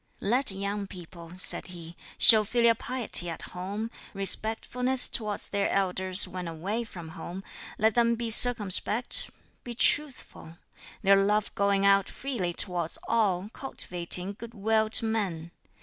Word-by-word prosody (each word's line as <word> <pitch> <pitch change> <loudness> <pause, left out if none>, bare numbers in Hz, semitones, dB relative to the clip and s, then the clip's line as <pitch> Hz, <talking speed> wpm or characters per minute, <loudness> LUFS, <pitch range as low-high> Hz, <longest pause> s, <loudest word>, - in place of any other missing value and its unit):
"Let 250 +6 -1
young 200 +1 -5
people," 170 -2 -13
said 185 - +1
he, 170 -2 -12 0.2
"show 220 -2 +9
filial 235 +2 +2
piety 230 -7 +2
at 165 - -6
home, 200 +5 -6 0.2
respectfulness 225 +6 +2
towards 210 -3 -4
their 200 -1 -2
elders 190 0 +1
when 180 -1 -7
away 190 +8 -5
from 170 -6 -11
home; 180 +4 -9 0.3
let 220 +1 +1
them 235 0 +1
be 230 0 -4
circumspect, 225 0 +3 0.3
be 240 -1 -8
truthful; 255 - -1 0.5
their 195 0 +4
love 210 +1 -1
going 200 -1 0
out 195 -1 +2
freely 240 -11 -5
towards 175 -2 -1
all, 205 -4 -1
cultivating 180 -6 -4
good 235 +3 -12
will 220 +1 0
to 225 - -2
men. 185 -7 -4
200 Hz, 135 wpm, -26 LUFS, 180-225 Hz, 0.5 s, show